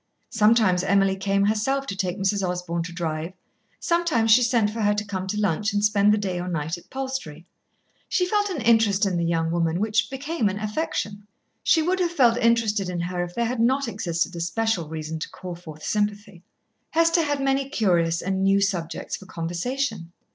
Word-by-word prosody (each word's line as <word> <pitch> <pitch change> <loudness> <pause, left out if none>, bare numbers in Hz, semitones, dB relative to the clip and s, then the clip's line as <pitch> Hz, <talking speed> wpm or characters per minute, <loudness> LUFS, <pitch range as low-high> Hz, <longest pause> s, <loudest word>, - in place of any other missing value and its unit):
Sometimes 215 -4 +3
Emily 195 0 +3
came 195 +1 +1
herself 245 +7 0
to 200 - -4
take 185 -1 -2
Mrs. 195 0 0
Osborn 180 -2 -2
to 170 +1 -5
drive, 165 0 -4 0.5
sometimes 335 -11 +1
she 245 +3 +7
sent 230 -3 +2
for 225 +1 -4
her 205 0 +2
to 210 0 -2
come 190 -2 -4
to 210 +2 -2
lunch 205 +1 0
and 205 0 +2
spend 210 0 +4
the 210 - +3
day 190 -4 -2
or 180 - -4
night 165 -2 -2
at 175 - -15
Palstrey. 260 - -5 0.6
She 360 - +2
felt 410 +2 +1
an 335 -9 -3
interest 220 -3 +3
in 190 -2 0
the 170 - 0
young 165 -1 0
woman 170 0 0
which 215 +1 +1
became 270 -3 -1
an 200 - -4
affection. 210 -2 -3 0.3
She 320 - +3
would 370 +3 0
have 355 -2 +2
felt 245 -7 +3
interested 225 -5 +2
in 175 -1 -3
her 175 +1 -2
if 175 0 -8
there 235 - 0
had 245 +1 -2
not 260 +3 +2
existed 175 -4 -2
a - - -5
special 180 -1 -1
reason 160 0 -5
to - - -5
call 180 -1 -8
forth 155 -3 -11
sympathy. 205 -3 -2 0.5
Hester 330 +1 +3
had 290 -3 -1
many 270 0 0
curious 175 - +1
and 190 0 -1
new 195 +1 +4
subjects 175 -5 -2
for 190 - -14
conversation. 175 +3 -3
205 Hz, 200 wpm, -24 LUFS, 175-235 Hz, 0.6 s, she